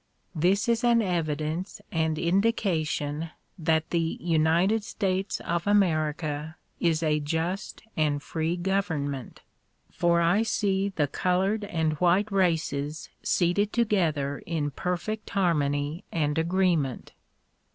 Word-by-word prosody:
This 185 +7 +2
is 235 0 +1
an 235 -1 +5
evidence 160 -1 -2
and 160 -1 0
indication 165 -5 0 0.3
that 160 -1 +1
the 165 -1 0
United 170 +6 +2
States 195 -3 -2
of 170 +2 -2
America 155 -5 +1 0.2
is 165 -1 +1
a 150 -1 +2
just 165 +6 -3
and 145 -2 0
free 165 +2 -2
government, 160 - -2 0.5
for 170 -1 +2
I 170 +5 +3
see 200 -3 +1
the 165 -7 0
colored 190 +7 0
and 160 -5 0
white 185 +4 +3
races 160 -5 0
seated 195 +4 +1
together 165 -12 +1
in 155 -3 -1
perfect 180 +7 -3
harmony 150 -2 0
and 150 -3 0
agreement. 170 -6 0
170 Hz, 110 wpm, -27 LUFS, 155-190 Hz, 0.5 s, an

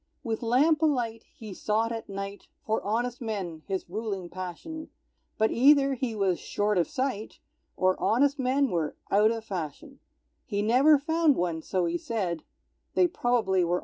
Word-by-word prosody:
With 225 -3 -2
lamp 280 +7 +3
alight 245 -8 0
he 215 -3 -8
sought 220 +4 0
at 225 -2 -5
night 195 0 -6 0.2
For 220 0 0
honest 240 +4 -2
men, 195 -8 -4
his 190 -2 -3
ruling 195 -2 -4
passion; 185 - -7 0.5
But 220 0 +2
either 275 +2 +5
he 245 -3 -3
was 195 -4 +1
short 205 -2 0
of 170 - +1
sight, 255 -5 -3 0.4
Or 185 0 +3
honest 280 +5 +2
men 265 +2 +2
were 160 -4 -1 0.2
out 210 +2 +5
of 225 -1 -3
fashion; 190 - -6 0.4
He 205 -2 -2
never 265 +8 +5
found 320 0 +2
one, 170 -2 -1
so 185 +1 -1
he 170 0 -1
said; 180 -8 -2 0.5
They 365 - +5
probably 235 - +1
were 170 0 0
all - - +4
in - - +1
bed. - - -2
220 Hz, 175 wpm, -28 LUFS, 190-260 Hz, 0.5 s, either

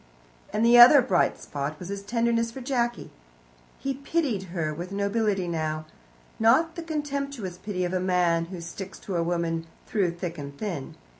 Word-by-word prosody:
And 215 +3 +1
the 240 +1 +7
other 250 +4 +10
bright 230 -9 +2
spot 145 +1 -4
was 180 +2 -8
his 200 0 -4
tenderness 230 +2 +1
for 230 - -8
Jacky. 240 -2 -1 0.7
He 275 - -2
pitied 275 - -1
her 165 -3 -2
with 175 +4 -6
nobility 200 -1 0
now 155 -2 -2 0.5
not 315 +9 +4
the 340 - -6
contemptuous 280 - -4
pity 185 -2 -2
of 175 - -3
a 185 - +1
man 180 -2 +2
who 175 0 -8
sticks 190 +3 -7
to 195 - -5
a 170 - +2
woman 165 -1 -1 0.2
through 200 -5 +1
thick 170 -2 -5
and 140 0 -8
thin. 170 -9 -5
195 Hz, 170 wpm, -26 LUFS, 170-235 Hz, 0.7 s, other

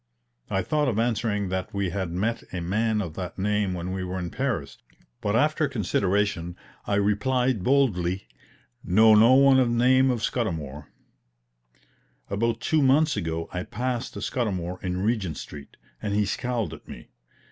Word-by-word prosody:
I 95 - 0
thought 150 -2 0
of 115 -5 0
answering 110 -4 0
that 95 +1 -4
we 100 -3 -1
had 95 -1 -2
met 105 +7 -1
a 90 - -3
man 105 +5 0
of 85 -4 -7
that 90 0 -6
name 100 -1 0
when 90 +1 -4
we 95 0 -3
were 90 0 -4
in 90 -2 -4
Paris; 115 - -3 0.4
but 105 +1 0
after 155 +5 +2
consideration, 100 -6 0 0.3
I 100 - +1
replied 110 +3 +1
boldly: 100 -9 +1 0.6
"Know 110 +4 +5
no 115 +4 +7
one 135 -1 +6
of 125 -2 +3
name 130 +3 +4
of 120 -3 -1
Scudamour." 75 - -3 1.4
About 115 +3 0
two 155 +4 +2
months 145 +3 +4
ago 80 -4 -3
I 90 - -2
passed 125 +5 -3
Scudamour 90 -7 -2
in 90 0 -2
Regent 105 -8 -1
Street, 70 -1 -10 0.2
and 100 -1 -2
he 105 0 +2
scowled 120 +2 -2
at - - -12
me. - - -11
105 Hz, 160 wpm, -25 LUFS, 90-125 Hz, 1.4 s, no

